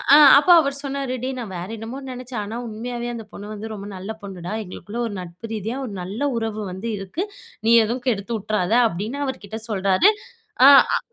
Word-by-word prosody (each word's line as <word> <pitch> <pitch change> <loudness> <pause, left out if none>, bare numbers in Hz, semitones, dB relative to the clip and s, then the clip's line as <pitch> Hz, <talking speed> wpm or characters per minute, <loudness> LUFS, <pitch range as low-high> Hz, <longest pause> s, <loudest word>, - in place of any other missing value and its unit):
ஆ - - +9 0.2
அப்ப 300 - +2
அவர் 280 -2 -1
சொன்னாரு 275 -2 -3
"டே 260 - -1
நான் 220 -6 -6
வேற 175 +3 -6
என்னமோ 225 +4 -6
நெனச்சேன். 250 -2 -5
ஆனா 215 +3 -6
உண்மையாவே 240 +2 -5
அந்த 230 -1 -6
பொண்ணு 205 - -9
வந்து 215 +1 -6
ரொம்ப 205 -1 -7
நல்ல 190 +3 -6
பொண்ணுடா. 185 -2 -7
எங்களுக்குள்ள 205 +4 -8
ஒரு 215 - -6
நட்பு 180 +5 -9
ரீதியா 220 +4 -3
ஒரு 220 - -7
நல்ல 195 +7 -6 0.2
உறவு 220 -1 -3
வந்து 190 +6 -5
இருக்கு. 195 - -4 0.4
நீ - - +5
எதுவும் 240 +3 -3
கெடுத்துவுட்டுறாத" 215 -3 -1 0.2
அப்டின்னு 220 +11 -4
அவர்கிட்ட 220 -5 -5
சொல்றாரு. 195 - +4 0.5
ஆ - - +11 0.3
அ - - -2
220 Hz, 185 wpm, -22 LUFS, 195-245 Hz, 0.5 s, ஆ